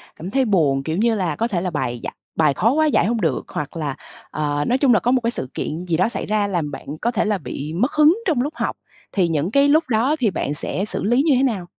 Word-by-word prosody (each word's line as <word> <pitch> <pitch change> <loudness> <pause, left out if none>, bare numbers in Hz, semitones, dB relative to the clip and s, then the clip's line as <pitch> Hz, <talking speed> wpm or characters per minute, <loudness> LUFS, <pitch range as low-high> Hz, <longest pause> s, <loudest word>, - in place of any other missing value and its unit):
cảm 175 +4 -7
thấy 265 +1 +2
buồn, 150 - +2
kiểu 160 +4 -2
như 225 +1 +2
là, 175 -7 -1
có 230 +2 0
thể 180 -7 -1
là 185 - -1
bài 120 -7 -3
giải - - -5 0.2
bài 155 -3 +4
khó 225 - +2
quá 310 +3 +2
giải 285 - +3
hông 230 +1 0
được, 160 -7 0
hoặc 150 +3 -5
là, 145 -4 -3 0.4
ờ, 145 -1 -1
nói 250 - +2
chung 265 -3 +4
là 210 - +4
có 245 - +1
một 260 - +2
cái 230 0 0
sự 130 - -4
kiện 165 +4 -4
gì 165 -2 0
đó 185 +5 +2
xảy - - -4
ra 210 -1 +1
làm 170 -6 -2
bạn 135 - -8 0.2
có 235 - +1
thể 220 - 0
là 210 -2 +1
bị 145 +1 -6
mất 240 - +1
hứng 305 +3 +5
trong 295 -8 +2
lúc 290 +4 -2
học, - - -2 0.3
thì 185 -4 +2
những 165 +2 -1
cái 280 +3 +4
lúc 310 +3 +4
đó 245 +6 +2
thì 220 -6 +2
bạn 145 -3 -2
sẽ 190 +6 -3
xử - - -4
lý 240 +6 +3
như 300 -5 +4
thế 260 - +2
nào? 215 -9 0
200 Hz, 285 wpm, -21 LUFS, 160-245 Hz, 0.4 s, hứng